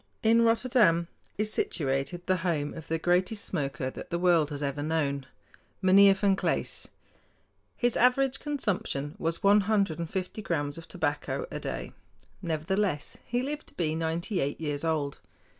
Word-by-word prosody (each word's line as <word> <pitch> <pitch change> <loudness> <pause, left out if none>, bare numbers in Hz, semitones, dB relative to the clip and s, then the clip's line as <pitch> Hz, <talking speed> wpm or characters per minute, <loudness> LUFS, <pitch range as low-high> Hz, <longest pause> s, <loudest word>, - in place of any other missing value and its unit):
In 230 +1 +5
Rotterdam 225 -7 +3 0.3
is 215 +1 0
situated 140 +3 -1
the 185 0 +2
home 165 -5 -1
of 165 -2 -9
the 165 - 0
greatest 180 +5 +1
smoker 135 -2 -2
that - - -9
the 170 - -1
world 170 -4 +3
has 145 -1 -4
ever 140 +1 -2
known, 145 -3 -1 0.5
Meinheer 195 +1 +7
Van 195 0 +2
Klaes. - - -1 0.9
His 245 -2 +2
average 260 +2 +3
consumption 195 - -2
was 165 +1 -2
one 205 +1 +6
hundred 200 -5 +1
and 170 -1 -3
fifty 190 +3 -4
grams 145 -5 -2
of 165 - -12
tobacco 160 - -2
a - - -4
day. - - -5 0.5
Nevertheless 170 0 -1
he 245 +1 -1
lived 295 +2 -4
to - - -16
be 155 -3 0
ninety 165 +4 -1
eight 140 -1 -1
years 150 -2 -2
old. 155 -4 -1
170 Hz, 160 wpm, -28 LUFS, 150-205 Hz, 0.9 s, Meinheer